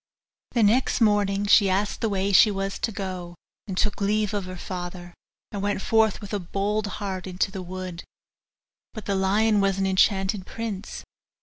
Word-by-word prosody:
The 235 Hz, -, +3 dB
next 235 Hz, +7 st, +3 dB
morning 205 Hz, -2 st, +2 dB
she 200 Hz, -1 st, +5 dB
asked 200 Hz, +2 st, -1 dB
the 225 Hz, -, +1 dB
way 195 Hz, 0 st, 0 dB
she 210 Hz, -, +7 dB
was 195 Hz, -1 st, -3 dB
to 225 Hz, -, -1 dB
go, 185 Hz, -3 st, -5 dB, 0.3 s
and 190 Hz, -2 st, -5 dB
took 210 Hz, 0 st, 0 dB
leave 210 Hz, +1 st, +1 dB
of 200 Hz, -2 st, -2 dB
her 185 Hz, 0 st, -7 dB
father, 175 Hz, -1 st, -6 dB, 0.4 s
and 200 Hz, -3 st, -4 dB
went 205 Hz, 0 st, 0 dB
forth 220 Hz, 0 st, +2 dB
with 205 Hz, 0 st, -8 dB
a 205 Hz, -, 0 dB
bold 200 Hz, +4 st, -1 dB
heart 190 Hz, -2 st, -4 dB
into 185 Hz, +1 st, -1 dB
the 190 Hz, -1 st, -5 dB
wood. 185 Hz, -1 st, -6 dB, 0.9 s
But 215 Hz, -, -7 dB
the 200 Hz, -, -1 dB
lion 205 Hz, +2 st, +2 dB
was 195 Hz, -1 st, +1 dB
an 195 Hz, -, 0 dB
enchanted 190 Hz, 0 st, +2 dB
prince. 220 Hz, -3 st, -5 dB
195 Hz, 180 wpm, -25 LUFS, 185-210 Hz, 0.9 s, she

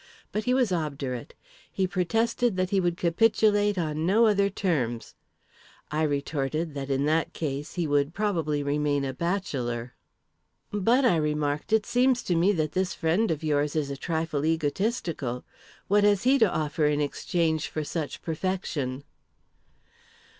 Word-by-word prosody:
But 215 Hz, 0 st, -2 dB
he 250 Hz, -, +2 dB
was 250 Hz, -6 st, +2 dB
obdurate. 140 Hz, -7 st, -3 dB, 0.4 s
He 190 Hz, -, 0 dB
protested 225 Hz, +5 st, 0 dB
that 185 Hz, 0 st, 0 dB
he 200 Hz, -, +3 dB
would 175 Hz, -2 st, 0 dB
capitulate 205 Hz, +3 st, +3 dB
on 155 Hz, -2 st, -1 dB
no 220 Hz, +5 st, +5 dB
other 200 Hz, -2 st, +3 dB
terms. 135 Hz, -, -2 dB, 0.8 s
I 155 Hz, +1 st, 0 dB
retorted 150 Hz, +1 st, -1 dB
that, 140 Hz, -1 st, -5 dB
in 135 Hz, +1 st, +1 dB
that 160 Hz, +2 st, +1 dB
case, 145 Hz, -2 st, -4 dB
he 175 Hz, -2 st, 0 dB
would 145 Hz, 0 st, +1 dB
probably 165 Hz, -8 st, 0 dB
remain 145 Hz, 0 st, 0 dB
a 135 Hz, -, -3 dB
bachelor." 130 Hz, -9 st, -2 dB, 0.8 s
"But," 230 Hz, +6 st, +3 dB
I 180 Hz, -9 st, +4 dB
remarked, 150 Hz, 0 st, -1 dB
"it 220 Hz, -2 st, +3 dB
seems 250 Hz, 0 st, +2 dB
to 175 Hz, -, 0 dB
me 175 Hz, +5 st, +4 dB
that 155 Hz, -6 st, -1 dB
this 185 Hz, 0 st, -1 dB
friend 175 Hz, +7 st, +1 dB
of 160 Hz, -1 st, -2 dB
yours 150 Hz, -1 st, 0 dB
is 145 Hz, -3 st, -1 dB
a -, -, -3 dB
trifle 160 Hz, 0 st, -2 dB
egotistical. 160 Hz, -, -1 dB, 0.4 s
What 205 Hz, +1 st, +3 dB
has 205 Hz, -1 st, +3 dB
he 270 Hz, +2 st, +4 dB
to 220 Hz, -6 st, +4 dB
offer 150 Hz, 0 st, 0 dB
in 150 Hz, 0 st, +1 dB
exchange 160 Hz, +2 st, 0 dB
for 155 Hz, -, -3 dB
such 150 Hz, 0 st, -4 dB
perfection?" 160 Hz, -6 st, -3 dB
160 Hz, 155 wpm, -27 LUFS, 145-200 Hz, 0.8 s, no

